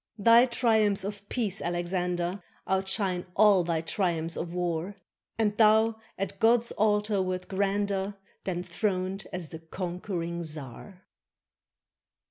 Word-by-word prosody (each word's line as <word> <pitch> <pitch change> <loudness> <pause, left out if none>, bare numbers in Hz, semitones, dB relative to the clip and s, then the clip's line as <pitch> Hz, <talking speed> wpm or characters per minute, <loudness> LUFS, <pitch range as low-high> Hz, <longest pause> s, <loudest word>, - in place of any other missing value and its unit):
Thy 230 +4 +6
triumphs 220 -5 +2
of 200 0 -6
peace, 215 -5 -1
Alexander, 175 +1 -2 0.3
Outshine 190 -1 0
all 205 -4 +6
thy 165 -1 -1
triumphs 165 -2 -1
of 170 - -4
war, 175 +2 -2 0.4
And 210 -2 +1
thou 220 +1 +4 0.2
at 195 - -4
God's 235 +1 +4
altar 210 -1 +1
wert 185 -1 -3
grander 200 0 -1 0.3
Than 180 -2 -2
throned 185 +1 -2
as 180 -4 -5
the 160 - -8
conquering 170 0 -4
czar! 155 - -6
190 Hz, 115 wpm, -28 LUFS, 175-210 Hz, 0.4 s, Thy